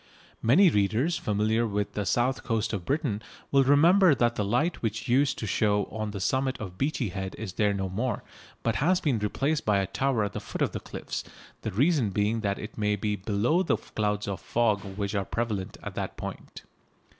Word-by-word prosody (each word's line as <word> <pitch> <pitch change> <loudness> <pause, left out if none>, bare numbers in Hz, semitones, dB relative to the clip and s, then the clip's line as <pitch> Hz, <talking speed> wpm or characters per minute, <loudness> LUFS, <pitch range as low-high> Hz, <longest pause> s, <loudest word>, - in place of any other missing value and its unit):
Many 165 - +6
readers 115 - +1
familiar 110 +2 +1
with 105 -1 -2
the 105 -3 -2
south 125 +6 +1
coast 115 -2 -1
of 95 -4 -3
Britain 135 -8 -1 0.3
will 140 -1 +5
remember 165 +5 +6
that 120 -2 +2
the 105 - -1
light 125 - 0
which 110 -1 -2
used 130 +2 +3
to - - -4
show 105 0 +2
on 110 -1 -3
the 100 -1 -5
summit 130 +6 0
of 95 -4 -7
Beachy 135 -5 0
Head 95 0 -5
is 105 -4 -5
there 105 0 +2
no 95 -1 -2
more, 115 +7 -2 0.4
but - - +1
has 180 +6 +3
been 140 -10 +1
replaced 140 +9 0
by 105 -2 +2
a 100 - +1
tower 120 +4 0
at 105 0 -3
the - - -3
foot - - -3
of - - 0
the - - -4
cliffs, - - -6 0.4
the - - -3
reason 135 - +2
being 105 +3 0
that 100 -2 -1
it 105 +1 -8
may 105 0 +2
be 105 +1 -1
below 105 - +1
the 185 - +1
clouds 105 -1 -2
of 100 -1 -3
fog 110 -4 +1 0.2
which 100 -1 -2
are 100 -2 0
prevalent 105 -3 -3
at - - -5
that - - -4
point. - - -8
110 Hz, 205 wpm, -27 LUFS, 100-135 Hz, 0.4 s, Many